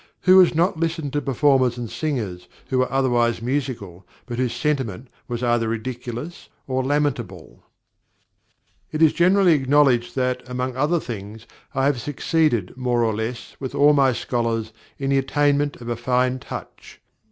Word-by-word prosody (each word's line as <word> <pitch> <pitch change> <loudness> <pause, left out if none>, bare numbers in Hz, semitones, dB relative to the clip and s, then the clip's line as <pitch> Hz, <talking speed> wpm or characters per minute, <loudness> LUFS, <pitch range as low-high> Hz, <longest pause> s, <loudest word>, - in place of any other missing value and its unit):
Who 185 +1 +7
has 180 -3 +5
not 170 0 +1
listened 165 -4 -2
to 145 - 0
performers 135 -3 +2
and 120 -1 -4
singers 115 - -4 0.2
who 130 - +1
were 130 -1 +1
otherwise 120 -3 +2
musical, 115 -8 -3 0.2
but 120 -1 -5
whose 125 -2 0
sentiment 130 -5 -2 0.2
was 120 0 -4
either 120 -1 +1
ridiculous 120 +6 -6 0.2
or 130 0 -1
lamentable? 125 - -2 1.3
It 155 +1 +1
is 155 - +5
generally 180 +1 +4
acknowledged 135 -4 +3
that, 125 -1 0
among 125 0 -3
other 150 +6 +1
things, 110 -3 -8 0.3
I 135 0 +1
have 140 -4 +1
succeeded 145 - 0
more 125 -2 0
or 110 -1 +1
less 110 +3 -5
with 135 0 -5
all 145 +1 +5
my 135 -2 +4
scholars 115 -2 -2 0.2
in 135 0 -2
the 135 - +4
attainment 145 +1 +1
of 120 - -11
a 120 - -1
fine 125 +2 0
touch. - - -9
130 Hz, 155 wpm, -22 LUFS, 120-145 Hz, 1.3 s, Who